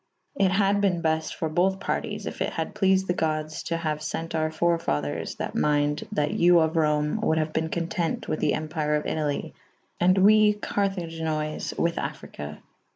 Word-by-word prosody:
It 200 -9 +2
had 200 +1 +2
ben 180 -4 +1
befte 160 0 0
for 160 - -2
bothe 185 +5 +1
parties - - -3
if - - -6
it - - -1
had - - -3
pleafed 190 -2 +3
the 180 - 0
goddes 155 -2 -2
to 165 - -1
haue 155 -2 -1
fent 155 +2 -4
our 155 -1 +1
fore 170 +1 +1
faders 75 - -2
that - - -4
mynde 150 0 +1
/ - - -32
that 150 -6 +1
you 175 0 +5
of 160 +1 +1
Rome 150 -1 +1
wolde 160 - +2
have 155 0 -1
ben 160 0 0
content 170 0 -2
with 155 - -2
the - - +2
Empyre 155 -1 -1
of 150 - -4
Italy 150 -2 -2 0.3
/& 185 +1 +1
we 215 0 +6
Caraginoys' 165 -7 -2
with 170 0 0
Affryke. 75 +1 -6
160 Hz, 185 wpm, -26 LUFS, 155-180 Hz, 0.3 s, we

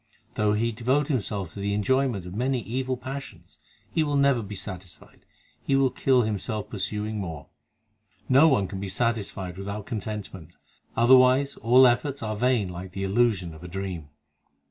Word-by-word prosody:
Though 105 -1 +1
he 115 +2 +1
devote 130 +6 0
himself 100 - -2
to - - -8
the 100 0 -1
enjoyment 120 -2 +1
of 90 - -8
many 125 +3 0
evil 130 +3 -2
passions, 135 +2 -9 0.3
He 160 - +1
will 145 -1 -1
never 140 -3 +3
be 105 -1 -7
satisfied; 95 -2 -10 0.3
he 135 - 0
will 135 -1 +3
kill 130 -1 +3
himself 105 0 -3
pursuing 105 +1 -3
more. 80 -7 -6 0.8
No 135 +5 +6
one 125 -11 +2
can 95 - -6
be 100 0 -4
satisfied 100 -4 -2
without 100 +1 -5
contentment; 105 -7 -6 0.4
Otherwise 130 +3 +5
all 125 +3 +6
efforts 130 +2 +1
are 110 -1 -2
vain 120 -2 +1
like 90 +1 -8
the 95 - -4
illusion 95 -4 +1
of 80 +2 -13
a - - -7
dream. 90 -4 -5
110 Hz, 165 wpm, -26 LUFS, 95-130 Hz, 0.8 s, No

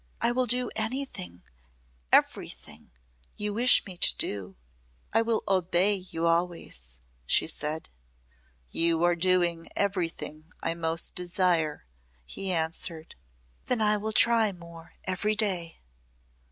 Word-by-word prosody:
"I 235 - +2
will 250 +1 +1
do 250 +1 +1
anything 220 - -3 0.7
everything - - 0 0.5
you 210 0 -2
wish 245 +4 +5
me 185 -3 -6
to - - +4
do. 95 -2 -3 0.6
I 225 - +4
will 230 -1 0
obey 185 +1 +3
you 180 -4 -4
always," 165 - -1 0.3
she - - +4
said. 155 +2 -2 0.8
"You 165 0 +2
are 175 0 +3
doing 175 -1 +1
everything 170 -5 -2
I - - 0
most 165 0 -1
desire," 175 - 0 0.4
he 190 - -3
answered. 160 -1 -3 0.5
"Then 250 - +1
I 210 -1 +3
will 215 +1 -3
try 225 -1 +4
more 170 -2 -13
every 195 +3 0
day." 185 -6 0
180 Hz, 120 wpm, -28 LUFS, 165-210 Hz, 0.8 s, wish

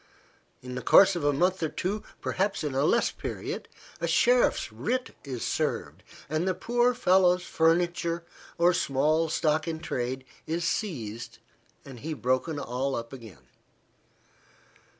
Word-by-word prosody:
In 125 0 -7
the 125 - -4
course 195 - +6
of 170 - -3
a 145 - +3
month 180 +6 +1
or 160 - 0
two, 200 +7 -2 0.2
perhaps 195 0 -1
in 150 -3 -2
a 135 - +1
less 235 - +3
period, - - -5 0.3
a - - -1
sheriff's - - +3
writ 255 +1 -2
is 130 -4 -5
served, - - -2 0.3
and 155 +5 -1
the 185 - +1
poor 240 +1 +1
fellow's 180 -4 +4
furniture, 170 0 +1 0.3
or 175 +1 +4
small 155 +1 +1
stock 155 0 +1
in 160 -1 -3
trade, 130 -3 -3 0.2
is 170 +2 -1
seized, 120 - -3 0.5
and 130 -3 -10
he 155 +5 -4
broken 130 +4 0
all 135 0 -2
up 115 +2 -6
again. 110 - -12
160 Hz, 145 wpm, -28 LUFS, 135-180 Hz, 0.5 s, course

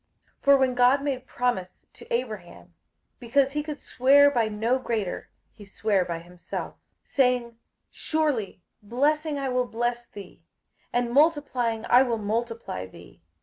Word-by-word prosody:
58:006:013 - - -43
For 280 0 +7
when 260 -1 +2
God 250 +3 +4
made 265 -3 -3
promise 240 -8 -3
to - - -15
Abraham, 215 -7 -5 0.5
because 265 +3 +2
he 295 +1 -1
could 300 -1 -6
swear 285 +3 +4
by 235 -5 +1
no 225 +5 0
greater, 225 -7 -3 0.2
he 210 - -14
sware 200 -1 0
by 170 -1 -4
himself, 175 +1 -7 0.3
58:006:014 - - -33
Saying, 250 -3 +1 0.3
Surely 290 - -2 0.2
blessing 290 +7 0
I 275 -1 -2
will 250 -1 0
bless 240 +1 -2
thee, 200 -3 -12 0.5
and 245 -1 0
multiplying 265 -7 +2
I 245 - +6
will 240 -3 +1
multiply 220 - -3
thee. 95 - -16
245 Hz, 145 wpm, -26 LUFS, 220-270 Hz, 0.5 s, For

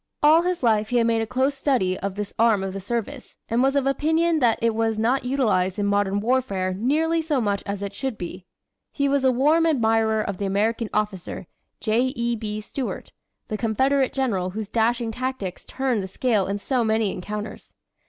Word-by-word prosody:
All 310 +3 +7
his 360 -4 -2
life 215 -2 +2
he 245 - +1
had 230 - +3
made 230 -1 +2
a 225 - -2
close 260 +4 +1
study 260 -10 +1
of 195 0 -4
this 205 -1 -5
arm 225 -4 +4
of 190 -1 -4
the 195 - -4
service, 235 +6 -4
and 235 +1 +2
was 270 +1 +2
of 280 -1 +2
opinion 320 +4 +2
that 235 -4 +3
it 230 0 +1
was 225 0 0
not 245 +4 +1
utilized 220 -8 +1
in 205 - 0
modern 200 0 +1
warfare 205 -6 0
nearly 310 - +1
so 310 -4 0
much 205 -3 0
as 200 0 -3
it 200 0 -4
should 265 -1 -4
be. 180 +1 -7 0.4
He 280 -1 0
was 280 -1 +1
a 260 - +5
warm 300 +6 +3
admirer 225 -6 +2
of 200 -3 -4
the 200 - -1
American 215 +3 0
officer, 205 -4 -3 0.3
J. 240 +4 +1
E. 235 -1 0
B. 215 -1 -4
Stuart, 255 +4 -5 0.4
the 215 - -3
Confederate 260 +5 +1
General 210 -9 -1
whose 210 +2 -5
dashing 230 +1 +1
tactics 250 -6 -4
turned 260 -5 -1
the 190 - -5
scale 210 0 0
in 200 +1 -1
so 245 +4 0
many 220 -2 +1
encounters. 210 +3 -7
225 Hz, 200 wpm, -24 LUFS, 205-265 Hz, 0.4 s, All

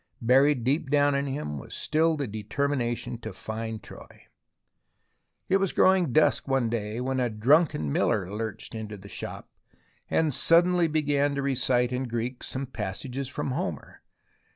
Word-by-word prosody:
Buried 130 +2 +4
deep 140 +3 0
down 145 0 +3
in 140 0 0
him 130 - -4
was - - -9
still 160 +1 +1
the 140 - -1
determination 120 +2 -2
to 110 -2 -6
find 110 +3 -6
Troy. - - -13 1.2
It 190 - +4
was 195 -2 0
growing 185 -6 +4
dusk 155 +2 +3
one 135 -4 +1
day 110 0 -3
when 130 +1 -1
a 125 -1 +1
drunken 115 - +2
miller 95 +6 +1
lurched 105 +2 -5
into 110 -2 -6
the 100 +1 -12
shop, - - -6 0.6
and 160 -3 +1
suddenly 175 +4 +4
began 145 -2 +1
to 140 - -2
recite 125 -2 +1
in 130 +1 -2
Greek 120 +2 -3
some 135 +1 -4
passages 120 +3 -5
from 135 0 -4
Homer. 175 +9 -4
130 Hz, 155 wpm, -27 LUFS, 110-145 Hz, 1.2 s, Buried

